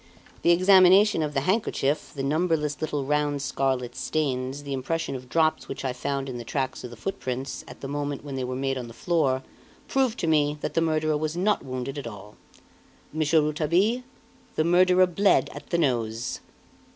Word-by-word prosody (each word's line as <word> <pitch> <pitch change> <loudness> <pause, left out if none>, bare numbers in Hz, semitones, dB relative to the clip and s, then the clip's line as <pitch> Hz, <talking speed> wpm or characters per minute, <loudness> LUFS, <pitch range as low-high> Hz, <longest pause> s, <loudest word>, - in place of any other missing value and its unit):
the - - +2
examination 185 +2 +6
of 150 -1 -2
the 135 - +2
handkerchief, 150 -5 0
the 135 - -3
numberless 150 0 0
little 145 -3 -2
round 145 0 0
scarlet 130 -2 -1
stains, 135 -2 -2
the 140 -1 -4
impression 160 +3 -2
of 125 -1 -8
drops 160 +1 +1
which - - -6
I 130 - -1
found 135 +1 -3
in 125 -2 -5
the - - -6
tracks 130 +1 -3
of 125 - -6
the 120 - -10
footprints, 130 - -4
at - - -12
the 135 - -5
moment 145 0 -3
when 140 - -6
they 130 -1 -2
were 125 0 -3
made 135 0 -1
on 120 - -6
the 115 - -12
floor, 140 -7 +1 0.4
prove 260 -3 +1
to - - -2
me 150 -2 +2
that - - -3
the 165 - +2
murderer 155 -1 +1
was 155 +2 -3
not 205 +4 +1
wounded 130 +2 -4
at 135 - -6
all. 105 -1 -10 0.8
Monsieur 155 0 +3
Rouletabille, 170 +10 +1 0.5
the 155 - +2
murderer 180 +2 +5
bled 195 +3 +2
at - - -10
the 170 - +1
nose!" 120 -7 -1
145 Hz, 190 wpm, -26 LUFS, 130-165 Hz, 0.8 s, examination